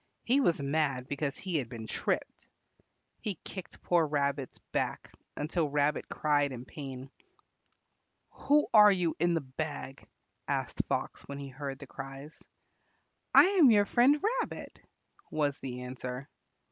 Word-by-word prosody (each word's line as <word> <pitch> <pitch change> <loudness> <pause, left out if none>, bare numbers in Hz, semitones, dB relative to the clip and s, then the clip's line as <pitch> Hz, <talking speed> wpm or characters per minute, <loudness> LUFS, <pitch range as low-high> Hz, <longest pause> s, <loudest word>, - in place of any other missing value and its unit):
He 260 +4 +3
was 175 - +2
mad 140 -3 0
because 140 0 -2
he 185 -4 -2
had 125 -6 -3
been 115 -3 -7
tripped. - - -3 0.7
He 205 -3 -3
kicked 190 -3 -9
poor 170 -3 +3
Rabbit's 140 -2 -1
back - - -2 0.3
until 155 +1 0
Rabbit 145 +1 +1
cried 145 -2 +1
in 125 -1 -7
pain. 135 -1 -8 1.2
"Who 295 +1 +2
are 210 -2 +9
you 180 -4 +1
in 175 +1 +3
the 165 - 0
bag?" 135 0 -6 0.4
asked - - -1
Fox - - -2
when 140 - -6
he 140 -1 -6
heard 135 0 -5
the 140 - -10
cries. 135 +3 -9 0.9
"I - - +11
am 365 -7 +6
your 205 -3 +5
friend 255 +8 +4 0.2
Rabbit," - - -7 0.5
was 145 -2 0
the 125 -1 -5
answer. 125 +1 -6
145 Hz, 140 wpm, -31 LUFS, 135-175 Hz, 1.2 s, I